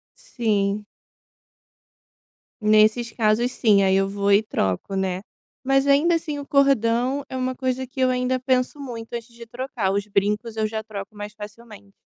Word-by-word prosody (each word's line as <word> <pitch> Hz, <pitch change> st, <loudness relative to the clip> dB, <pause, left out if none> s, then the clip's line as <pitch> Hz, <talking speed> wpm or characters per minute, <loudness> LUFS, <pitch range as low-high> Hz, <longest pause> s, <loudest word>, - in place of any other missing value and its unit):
Sim. 210 Hz, -, -1 dB, 1.8 s
Nesses 215 Hz, +2 st, +4 dB
casos 230 Hz, +2 st, +1 dB
sim, 205 Hz, -4 st, +4 dB
aí 190 Hz, 0 st, +3 dB
eu 195 Hz, 0 st, +2 dB
vou 200 Hz, 0 st, +1 dB
e 205 Hz, +2 st, +5 dB
troco, 95 Hz, -, -2 dB
né. 190 Hz, -1 st, -1 dB, 0.4 s
Mas 270 Hz, +1 st, +2 dB
ainda 295 Hz, +5 st, +4 dB
assim 305 Hz, -3 st, -3 dB
o 285 Hz, -, -7 dB
cordão 270 Hz, -1 st, +2 dB
é 260 Hz, -, -4 dB
uma 255 Hz, 0 st, -2 dB
coisa 260 Hz, 0 st, -2 dB
que 265 Hz, +2 st, -10 dB
eu 255 Hz, -, +4 dB
ainda 250 Hz, 0 st, 0 dB
penso 255 Hz, +2 st, 0 dB
muito 235 Hz, -5 st, -7 dB
antes 235 Hz, 0 st, -6 dB
de 235 Hz, 0 st, -11 dB
trocar, 240 Hz, -4 st, -3 dB
os 200 Hz, 0 st, -1 dB
brincos 210 Hz, +3 st, -1 dB
eu 215 Hz, 0 st, +1 dB
já 220 Hz, 0 st, -4 dB
troco 210 Hz, -1 st, -8 dB
mais 205 Hz, 0 st, -7 dB
facilmente. 210 Hz, -1 st, -12 dB
230 Hz, 165 wpm, -23 LUFS, 205-255 Hz, 1.8 s, e